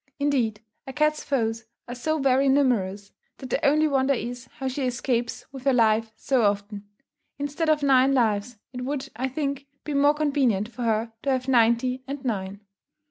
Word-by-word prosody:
Indeed, 250 -7 0 0.3
a 265 - -6
cat's 305 +1 +1
foes 230 -4 -1 0.2
are 245 - -5
so 310 +6 -1
very 270 -1 +3
numerous, 210 -8 +1 0.3
that 260 - -9
the - - 0
only 305 +2 +4
wonder 275 -1 +2
is, 240 +1 -5
how 270 -3 -3
she 260 0 -2
escapes 240 -1 -2
with 265 -2 -9
her 270 - +4
life 225 -2 +3
so 265 -3 +1
often. 205 0 -1 0.5
Instead 290 +3 -2
of 300 -2 +2
nine 265 -1 +5
lives, 225 -2 +1 0.2
it 250 - -5
would 275 +1 -3
I 255 +3 -1
think, 280 0 -3 0.2
be 300 - -4
more 285 +1 +4
convenient 270 -9 +1
for 240 +1 -9
her 225 0 0
to 280 - -2
have 260 -1 0
ninety 250 +1 +2
and 275 0 -6
nine. 200 -3 -3
255 Hz, 180 wpm, -25 LUFS, 225-280 Hz, 0.5 s, nine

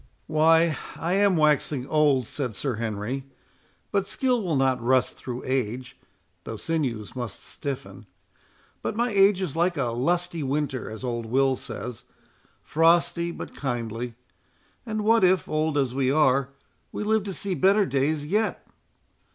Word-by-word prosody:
"Why, 160 +1 +3 0.2
I 170 +2 -2
am 195 -2 +3
waxing 150 -3 +2
old," 145 -4 +3
said 125 -2 -4
Sir 130 0 -2
Henry; 115 +4 -3 0.7
"but 195 -1 0
skill 250 0 +1
will 175 -6 -1
not 130 -2 +2
rust 130 +2 +2
through 125 -1 -6
age, 125 -1 -2 0.5
though - - -6
sinews 130 -10 -2
must 120 -4 -6
stiffen. 105 -8 -6 0.7
But - - -3
my 240 +1 +1
age 195 -1 +4
is 155 -6 -4
like 170 +1 +1
a 125 -4 0
lusty 170 +7 0
winter, 140 -2 -2
as 110 +3 -8
old 120 -2 -3
Will 135 +3 +2
says, 125 -2 -7 0.6
frosty 170 +2 +3
but 170 - -7
kindly; 120 -3 -4 0.7
and 215 -1 -2
what 225 0 +4
if, 185 -2 +3
old 155 -1 0
as 135 -3 +1
we 130 -1 +1
are, 140 -2 +3 0.4
we - - -4
live 215 0 +2
to 200 - -3
see 195 +1 -2
better 195 +5 +4
days 145 0 0
yet! 210 +8 0
145 Hz, 150 wpm, -25 LUFS, 125-175 Hz, 0.7 s, age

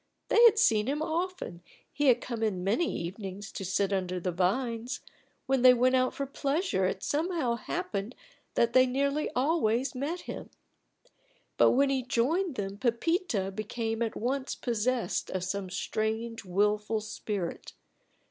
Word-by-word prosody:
They 465 - +5
had 450 -2 +7
seen 220 - +3
him 295 +3 0
often 340 - -3 0.3
he 290 +1 +1
had 245 -2 +5
come 235 -3 -5
in 200 -5 0
many 225 - +1
evenings 195 +3 -6
to 195 - -6
sit 195 +2 0
under 185 -1 -1
the 180 +1 -2
vines; 230 +7 -1 0.4
when 270 -2 +1
they 250 0 +8
went 255 +2 +3
out 255 0 +2
for 275 - -2
pleasure 280 - 0
it - - -3
somehow 315 -5 0
happened 235 - -4 0.4
that 235 0 +2
they 255 0 +6
nearly 280 +3 0
always 260 -3 +1
met 295 +7 -3
him; - - -7 1.1
but - - +5
when 275 +2 +3
he 265 -1 +1
joined 285 +8 0
them 200 -1 -4
Pepita 240 - 0
became 225 +2 -3
at 230 -2 -1
once 260 +3 -2
possessed 240 -3 -1
of 185 -1 -2
some 190 0 -3
strange 220 +4 -2
wilful 210 +3 +1
spirit. 210 -4 -5
235 Hz, 150 wpm, -29 LUFS, 205-275 Hz, 1.1 s, they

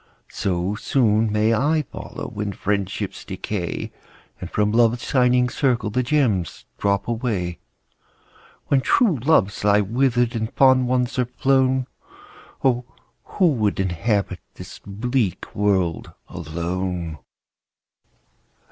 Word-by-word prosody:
So 90 0 -1
soon 110 -1 +1
may 110 +2 +2
I 150 +7 +2
follow, - - -7
When 100 -1 -3
friendships 100 0 -3
decay, 95 -5 -4 0.5
And 90 - -6
from 105 +1 +1
Love's 115 +1 +3
shining 125 -2 +3
circle 120 -4 0
The 125 +4 +1
gems 120 - 0
drop 100 0 0
away. 110 -8 -2 1.1
When 135 -2 +2
true 185 - +3
hearts 110 -12 +2
lie 105 0 +4
wither'd, 120 +2 +1
And 110 0 -2
fond 130 -2 +5
ones 125 +1 0
are 125 - +2
flown, 130 -1 +2 0.8
Oh! 125 -2 +2 0.4
who 185 -4 +2
would 105 -8 0
inhabit 95 +1 0 0.2
This - - -10
bleak 110 0 -2
world 95 -5 0 0.2
alone 85 0 -4
110 Hz, 110 wpm, -22 LUFS, 95-125 Hz, 1.1 s, fond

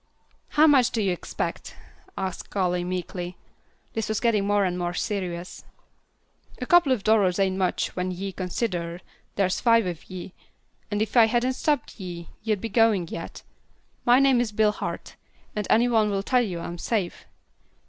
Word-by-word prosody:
"How 305 - +8
much 275 -6 +5
do 230 - -2
you 195 -3 +1
expect?" 175 - -4 0.4
asked 190 -1 -4
Callie, 180 -3 0
meekly. 180 0 -4 0.6
This 225 -1 -2
was 220 - 0
getting 215 -4 +2
more 205 -1 +3
and 180 -1 -1
more 175 0 -2
serious. 180 -4 -4 1.0
"A 250 - -3
couple 345 -2 +5
of 240 -6 +1
dollars 200 -5 +3
ain't 190 -1 +1
much 185 -1 -1
when 180 0 -1
ye 190 +2 -4
consider 180 -2 -3 0.3
there's 185 -2 +1
five 230 -2 +4
of 175 -3 -6
ye, 185 0 -7 0.6
and 205 +1 0
if 220 - -7
I 235 -2 +8
hadn't 240 +3 +1
stopped 290 -4 -1
ye, 175 -3 -7
ye'd 215 -3 -1
be - - -2
goin' 215 -6 +2
yet. 165 - -7 0.6
My 245 +1 +5
name's 250 -4 +3
Bill 210 0 +3
Hart, - - -6 0.4
and 210 -2 -2
any 235 +2 +4
one'll 210 -4 +2
tell 250 +3 +3
you 180 -7 -3
I'm 170 +1 -6
safe. 200 -5 -2
200 Hz, 165 wpm, -25 LUFS, 180-230 Hz, 1.0 s, How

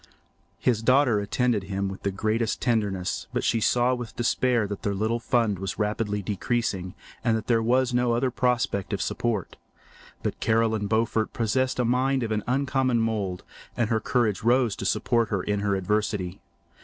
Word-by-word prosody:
His 115 -4 +1
daughter 125 -2 +4
attended 105 0 0
him 100 0 -2
with 95 0 -7
the 100 - 0
greatest 110 +3 -1
tenderness, 105 -7 -1
but - - -1
she 115 - +2
saw 120 +4 +3
with 120 -3 -5
despair 120 -1 +1
that 100 -1 -5
their 100 -1 -1
little 110 +4 0
fund 115 -5 +1
was 95 -2 -4
rapidly 105 -1 -1
decreasing 100 -2 -2 0.3
and 115 -2 +2
that 110 - -6
there 115 -2 +2
was 125 +2 +2
no 125 -1 +2
other 125 +2 +1
prospect 120 -5 0
of 100 - -1
support. 115 -5 -2 0.7
But - - -3
Caroline 110 -2 +1
Beaufort 110 0 0
possessed 125 +3 0
a 125 - +1
mind 130 +2 +1
of 110 - -3
an 105 -1 0
uncommon 130 -1 +1
mould, 105 -5 -1 0.3
and 120 -2 0
her 110 - +2
courage 115 -4 0
rose 120 -1 +3
to - - -5
support 115 -3 +1
her 95 -3 -1
in 105 0 -1
her 100 -1 0
adversity. 100 -1 -1
115 Hz, 175 wpm, -26 LUFS, 105-120 Hz, 0.7 s, daughter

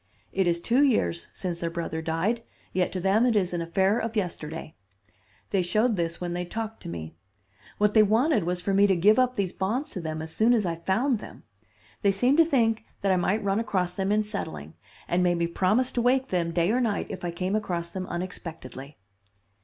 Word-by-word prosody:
It 190 -2 +1
is 170 0 +1
two 240 +9 +2
years 85 - +2
since 175 -3 -4
their 170 - -2
brother 165 -1 -4
died, 165 +9 -1 0.3
yet 180 -1 +1
to 185 - -2
them 195 +5 +3
it 245 -2 +3
is 185 -3 +1
an 175 - -1
affair 190 +6 +1
of 230 0 -3
yesterday. 165 -5 -4 0.8
They 195 - +2
showed 215 +6 +1
this 170 -2 -2
when 175 -1 -3
they 175 0 -2
talked 220 +4 -5
to - - -7
me. 80 -2 -6 0.6
What 210 0 +2
they 220 - +7
wanted 220 - +3
was 180 +1 -2
for 195 - -1
me 200 +1 +5
to 190 - +3
give 210 +7 +5
up 255 0 +2
these 195 -5 -1
bonds 225 +10 -2
to 185 - -5
them 155 -1 -4
as 160 0 -5
soon 235 +3 +4
as 215 -4 +1
I 170 - 0
found 220 +8 +1
them. - - -11 0.6
They 200 - +4
seemed 250 +9 +2
to 330 - +7
think 230 -8 +2 0.2
that 195 - +2
I - - +4
might 190 +4 +1
run 200 +1 +1
across 185 -5 -1
them 195 +1 -1
in 215 +1 +3
settling, 80 - -5 0.3
and 175 +1 +1
made 175 -1 +2
me 170 - +1
promise 210 +9 +2
to 240 - 0
wake 260 +2 +2
them 170 -2 0
day 170 +3 +2
or 250 +2 +2
night 220 -4 0
if - - -7
I 175 - -1
came 185 +4 -2
across 175 -5 -2
them 185 0 -5
unexpectedly." 160 -6 -7
190 Hz, 220 wpm, -26 LUFS, 170-220 Hz, 0.8 s, they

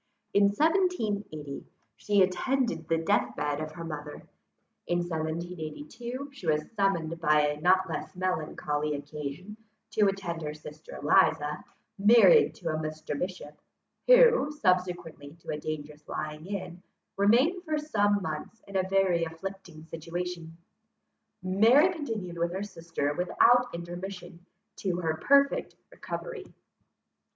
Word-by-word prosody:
In 200 0 +5
1780 210 - 0 0.3
she 205 -2 +3
attended 230 - 0
the 165 - +2
death 120 -7 +1
bed 145 0 -1
of 155 0 -5
her 165 +1 -7
mother; 150 -2 -7 0.6
in 175 - +1
1782 175 - -5
she 195 -11 -9
was 155 -1 0
summoned 170 -6 0
by 150 -1 +4
a 150 0 -5
not 185 +2 +4
less 165 +2 -5
melancholy 155 -4 -2
occasion, 150 +7 -7 0.3
to 210 -1 +3
attend 190 -4 -3
her 150 -1 -4
sister 150 0 -11
Eliza, 150 +1 +2 0.4
married 240 - +6
to 170 - -5
a 155 - -1
Mr. 155 -1 -4
Bishop, 160 -2 -6 0.5
who, - - +6
subsequently 175 - -1
to 170 - -8
a 150 - -3
dangerous 150 0 -6
lying 155 +2 -5
in, 185 -3 -5 0.3
remained 255 - +3
for 310 -3 -1
some 205 -9 +1
months 160 +7 -5
in 200 - -11
a 190 0 +1
very 190 -3 +2
afflicting 165 0 -7
situation. 165 0 -6 0.9
Mary 230 - +5
continued 215 - -5
with 170 0 0
her 190 +2 -3
sister 165 -7 -3
without 240 +9 +4
intermission, 175 +1 -7 0.3
to 185 -3 -1
her 160 -2 -1
perfect 280 0 +3 0.2
recovery. 455 -6 -6
180 Hz, 125 wpm, -28 LUFS, 155-205 Hz, 0.9 s, married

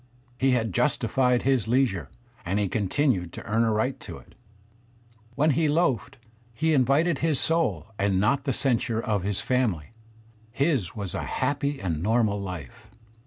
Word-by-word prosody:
He 135 -1 +3
had 115 -5 0
justified 125 +7 +1
his 130 -6 +1
leisure 120 -7 +1 0.3
and 95 +3 -1
he 105 - +1
continued 100 - 0
to - - -8
earn 115 +1 +1
a 115 - +2
right 110 +5 0
to - - -9
it. - - -17 1.0
When 150 +3 +3
he 155 +3 +2
loafed 135 - 0 0.4
he 160 +5 +1
invited 140 +3 +2
his 155 -4 +1
soul 160 - +1
and 100 -1 +2
not 135 +8 +1
the 135 - +1
censure 120 -4 0
of 105 -3 -1
his 100 +1 -1
family. 115 - -1 0.6
His 135 - 0
was 100 -4 -5
a - - -2
happy 145 0 -1
^nd 85 - -3
normal 105 0 +1
life. 90 -9 -8
120 Hz, 160 wpm, -26 LUFS, 100-140 Hz, 1.0 s, He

